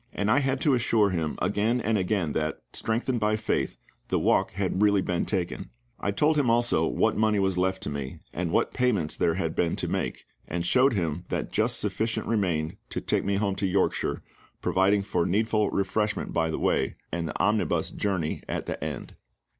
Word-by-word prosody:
And 105 +1 0
I 140 - +5
had 135 -1 0
to 145 - +3
assure 115 -4 +3
him 80 -4 -2
again 105 +6 +1
and 115 -1 0
again 95 -4 0
that, 75 0 -1
strengthened 120 +2 -1
by 105 0 +2
faith, 110 - -1 0.3
the - - +1
walk - - +2
had 95 0 -1
really 100 -2 +4
been 90 -1 -1
taken. 90 - -2 0.3
I - - -1
told 150 +10 +2
him 140 -5 +3
also 120 +1 +3
what - - +1
money 110 -1 +2
was 95 -2 +1
left 95 +1 0
to - - -3
me, 70 -2 -5 0.2
and 90 -1 -2
what - - +1
payments 105 - +1
there 85 - +1
had 80 -3 -1
been 85 -1 +1
to - - -3
make, - - -3 0.2
and 85 0 -2
showed 130 +7 +4
him 85 -3 -2
that - - -2
just - - +1
sufficient 115 +1 -1
remained 85 -8 0
to - - -2
take - - 0
me 100 0 0
home 100 0 +1
to 95 0 0
Yorkshire, 95 +1 0 0.4
providing 100 +2 +2
for 85 -3 0
needful 105 +2 +1
refreshment 105 +2 -1
by 80 -1 +1
the 80 - -2
way - - +1 0.2
and 85 0 -2
the 75 - -5
omnibus 105 +1 +1
journey 95 -6 -1
at - - -2
the - - -4
end. - - -5
100 Hz, 195 wpm, -27 LUFS, 85-110 Hz, 0.4 s, I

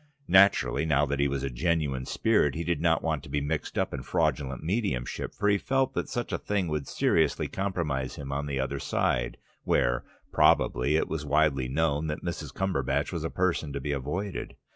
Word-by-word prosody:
Naturally, 95 -7 +5
now 75 -2 +3
that 70 0 -2
he 70 - +3
was 70 -1 -2
a 70 - -1
genuine 70 -2 -1
spirit, 105 -11 +2
he 85 - -2
did 85 -2 -1
not 85 -1 +2
want 80 -3 0
to - - -12
be 75 - 0
mixed 75 +1 -3
up - - 0
in - - -3
fraudulent 65 -2 -1
mediumship, 85 - -2
for 105 - 0
he 100 -1 +3
felt 135 +3 +1
that - - -2
such 120 - -3
a - - -1
thing 100 -3 -1
would 75 -2 -2
seriously - - +1
compromise 85 -9 -2
him 70 -1 -6
on 70 +1 -2
the 70 -2 -2
other 65 +1 -2
side, - - 0 0.3
where, - - +1 0.3
probably, 60 +5 +3
it 80 - +1
was 80 -2 -3
widely 70 -3 +2
known 75 +2 0
that 75 0 -4
Mrs. 85 - -4
Cumberbatch 70 -6 -1
was 85 -4 -3
a 80 - -1
person 85 -5 0
to 70 - -2
be 75 +2 -3
avoided. 80 +8 -3
75 Hz, 200 wpm, -28 LUFS, 70-85 Hz, 0.3 s, Naturally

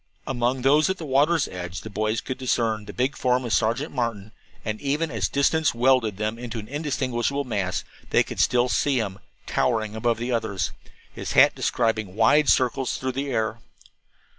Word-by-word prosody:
Among 125 0 -1
those 150 +5 +4
at 190 - -1
the 165 - -7
water's 145 +3 +3
edge 90 -1 -6
the 110 - -8
boys 110 +2 -1
could 130 - -5
discern 115 -4 0
the 105 - -7
big 130 +6 -1
form 125 0 +1
of 115 - -1
Sergeant 120 +8 0
Martin, 115 -5 -3 0.3
and 110 0 -3
even 150 +3 -1
as 105 -5 -1
distance 150 0 +2
welded 120 -4 +3
them 110 +2 -2
in 120 -2 -6
an 110 -1 -6
indistinguishable 140 -1 -1
mass, 95 - -2 0.3
they - - +4
could - - -8
still 125 0 +3
see 135 +2 +1
him, 100 -4 -2 0.3
towering 110 -3 0
above 115 +1 0
the 120 +2 -3
others, 100 -6 -1 0.4
his - - -5
hat - - +7
describing 110 -5 -1
wide 150 +6 +4
circles 130 0 +2
through 130 0 -2
the 135 +2 -3
air. 110 -2 -1
120 Hz, 180 wpm, -24 LUFS, 110-135 Hz, 0.4 s, hat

